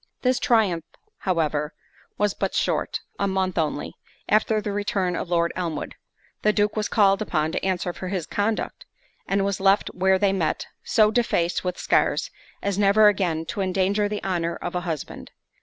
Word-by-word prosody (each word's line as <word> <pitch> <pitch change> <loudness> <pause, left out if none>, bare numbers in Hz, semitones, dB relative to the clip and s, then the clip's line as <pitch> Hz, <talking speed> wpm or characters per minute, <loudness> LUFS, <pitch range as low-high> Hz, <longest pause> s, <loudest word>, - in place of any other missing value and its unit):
This 255 0 +2
triumph 200 -9 +2 0.4
however 155 -5 -1 0.4
was 205 -1 +1
but - - -2
short—a 200 - -1
month 190 -2 0
only, 150 -2 -2 0.3
after 215 +1 +3
the 210 0 -3
return 200 -3 -1
of 175 - -4
Lord 170 -1 +1
Elmwood, 165 -5 -3 0.5
the 210 - +4
Duke 210 0 +1
was 215 -1 0
called 195 -2 +4
upon 160 -6 0
to - - -3
answer 180 -2 -1
for 185 - -6
his 180 -4 -2
conduct, 210 +5 -2 0.4
and 195 0 +1
was 200 -1 -1
left 195 +1 +3
where 190 +1 +3
they 195 0 +2
met, 175 -5 -1 0.2
so 215 -2 +4
defaced 180 -7 +1
with 180 -1 -2
scars, - - +1 0.3
as 200 -1 -1
never 210 +1 +6
again 175 -5 -1
to 200 - -4
endanger 195 +2 +1
the 210 0 -4
honour 170 -3 -1
of 175 - -5
a 180 - -1
husband. 155 -4 -5
195 Hz, 170 wpm, -24 LUFS, 175-205 Hz, 0.5 s, never